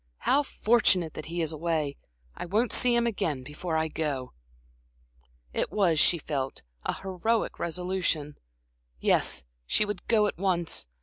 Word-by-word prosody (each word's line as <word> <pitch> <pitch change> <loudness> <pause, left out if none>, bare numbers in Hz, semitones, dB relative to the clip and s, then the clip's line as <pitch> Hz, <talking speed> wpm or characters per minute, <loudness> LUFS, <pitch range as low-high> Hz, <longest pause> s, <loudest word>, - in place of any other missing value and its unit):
How 280 - +4
fortunate 210 - +2
that 155 - -7
he 170 +1 -2
is 160 - 0
away! 155 -3 -1 0.4
I - - -6
won't 215 +6 +1
see 245 -1 +4
him 235 0 +3
again 160 - -1
before 160 +4 -3
I 160 0 +1
go." 145 -5 -3 1.2
It - - -1
was, 175 -7 +2
she 170 - +5
felt, 135 - -4 0.2
an - - -1
heroic 195 +4 -1
resolution. 170 -4 -1 0.6
Yes, 60 0 +2 0.2
she 210 - +2
would 205 -3 -5
go 215 -2 +4
at 200 - -3
once. 175 - +1
170 Hz, 145 wpm, -28 LUFS, 155-205 Hz, 1.2 s, she